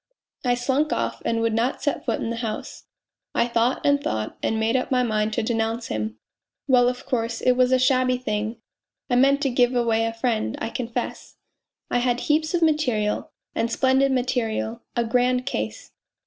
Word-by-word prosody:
I 245 Hz, -1 st, +2 dB
slunk 270 Hz, +5 st, 0 dB
off -, -, -2 dB
and 230 Hz, 0 st, +1 dB
would 230 Hz, -1 st, +1 dB
not 235 Hz, +4 st, 0 dB
set 285 Hz, -, -1 dB
foot 230 Hz, -, -1 dB
in 230 Hz, -, -2 dB
the 230 Hz, -, -3 dB
house. 225 Hz, -2 st, -5 dB, 0.5 s
I 235 Hz, -, +3 dB
thought 235 Hz, +1 st, +1 dB
and 285 Hz, 0 st, +3 dB
thought 110 Hz, 0 st, -2 dB
and 220 Hz, -, 0 dB
made 225 Hz, +2 st, +1 dB
up 255 Hz, -, 0 dB
my 255 Hz, -1 st, +2 dB
mind 215 Hz, -2 st, 0 dB
to 230 Hz, -, 0 dB
denounce 225 Hz, +1 st, -1 dB
him. 110 Hz, 0 st, -3 dB, 0.5 s
Well, 250 Hz, -2 st, +5 dB
of 250 Hz, +2 st, -6 dB
course, 230 Hz, -2 st, -1 dB
it 255 Hz, -, +3 dB
was 250 Hz, 0 st, +3 dB
a 260 Hz, -, +5 dB
shabby 255 Hz, 0 st, +3 dB
thing 215 Hz, -2 st, -3 dB, 0.5 s
I -, -, +4 dB
meant 275 Hz, +3 st, +4 dB
to 270 Hz, -, +1 dB
give 245 Hz, 0 st, +3 dB
away 225 Hz, -2 st, +2 dB
a 225 Hz, -, -2 dB
friend, 225 Hz, -, -1 dB
I -, -, -3 dB
confess. 235 Hz, -1 st, -4 dB, 0.6 s
I 245 Hz, -, +2 dB
had 245 Hz, 0 st, 0 dB
heaps 315 Hz, +2 st, +1 dB
of 340 Hz, -, +1 dB
material 250 Hz, -10 st, +1 dB, 0.2 s
and 230 Hz, -, 0 dB
splendid 265 Hz, +2 st, +3 dB
material 240 Hz, -3 st, -1 dB
a 235 Hz, -, +1 dB
grand 250 Hz, +2 st, +1 dB
case. 105 Hz, 0 st, -4 dB
245 Hz, 190 wpm, -24 LUFS, 225-255 Hz, 0.6 s, Well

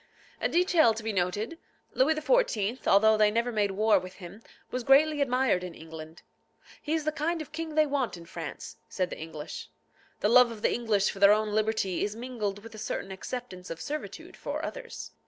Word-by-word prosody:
A -, -, +1 dB
detail 335 Hz, -9 st, +4 dB
to 220 Hz, -, -6 dB
be 220 Hz, -1 st, -2 dB
noted. 205 Hz, -, -1 dB, 0.3 s
Louis 300 Hz, +5 st, +3 dB
XIV., 265 Hz, -, +1 dB
although 220 Hz, +2 st, +5 dB
they 215 Hz, -1 st, +5 dB
made 220 Hz, -2 st, 0 dB
war 215 Hz, +3 st, +3 dB
with 185 Hz, 0 st, -10 dB
him, 190 Hz, +4 st, -11 dB, 0.3 s
was 250 Hz, -1 st, -2 dB
greatly 290 Hz, +3 st, +5 dB
admired 255 Hz, -8 st, +2 dB
in 180 Hz, -2 st, -7 dB
England. 160 Hz, 0 st, -10 dB, 0.6 s
"He 300 Hz, -, -2 dB
is 315 Hz, -2 st, -2 dB
the 310 Hz, -, +1 dB
kind 315 Hz, +3 st, -1 dB
of 310 Hz, -1 st, -7 dB
king 320 Hz, 0 st, -5 dB
they 310 Hz, 0 st, +5 dB
want 275 Hz, -8 st, -1 dB
in 170 Hz, -, -11 dB
France," 165 Hz, -3 st, -7 dB
said 185 Hz, -2 st, -2 dB
the -, -, -6 dB
English. 160 Hz, -1 st, -7 dB, 0.5 s
The -, -, +3 dB
love 245 Hz, +2 st, +7 dB
of 220 Hz, -2 st, -9 dB
the -, -, +3 dB
English 215 Hz, -4 st, +1 dB
for 195 Hz, -, -10 dB
their 200 Hz, +1 st, +8 dB
own 215 Hz, 0 st, 0 dB
liberty 215 Hz, -4 st, 0 dB
is 210 Hz, +1 st, -2 dB
mingled 220 Hz, -5 st, -4 dB
with 230 Hz, 0 st, -11 dB
a 215 Hz, -, -9 dB
certain 195 Hz, -2 st, -4 dB
acceptance 190 Hz, -1 st, -7 dB
of 165 Hz, -, -6 dB
servitude 300 Hz, -, -6 dB
for -, -, -4 dB
others. -, -, -7 dB
220 Hz, 195 wpm, -28 LUFS, 195-275 Hz, 0.6 s, their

